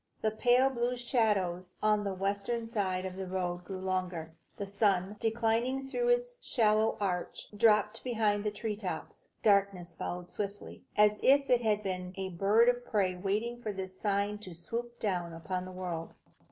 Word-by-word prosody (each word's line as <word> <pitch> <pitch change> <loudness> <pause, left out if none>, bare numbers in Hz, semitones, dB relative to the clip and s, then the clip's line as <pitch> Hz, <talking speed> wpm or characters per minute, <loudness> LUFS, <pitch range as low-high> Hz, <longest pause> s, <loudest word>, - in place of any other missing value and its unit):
The 220 - +3
pale 245 +4 +4
blue 245 0 -1
shadows 200 -8 0
on 210 -1 +3
the 195 -1 -2
western 200 +4 -1
side 190 -5 -1
of 185 -1 -5
the 190 -1 -4
road 180 -1 -2
grew 185 +1 -6
longer. 185 -4 -2 0.2
The 200 - -3
sun, 200 -1 +1
declining 230 +4 +1
through 485 - -1
its - - +1
shallow 215 -1 +2
arch, 180 -3 -3
dropped 210 0 +3
behind 215 -4 +1
the 210 - +1
tree 210 +1 -3
tops. 185 -6 -6 0.2
Darkness 200 -4 +2
followed 175 +2 -5
swiftly, 205 0 -5 0.2
as 210 0 +5
if 275 0 +4
it 245 -1 +5
had 210 -2 +1
been 185 -1 -3
a 190 -1 -3
bird 200 +6 +4
of 245 0 +2
prey 200 -6 +1
waiting 210 +6 -2
for 215 - -2
this 190 -1 -7
sign 205 0 0
to 185 -5 -9
swoop 235 +8 -5
down 175 -5 -1
upon 180 +3 -4
the 185 - -8
world. 180 -3 -5
205 Hz, 170 wpm, -31 LUFS, 185-225 Hz, 0.2 s, as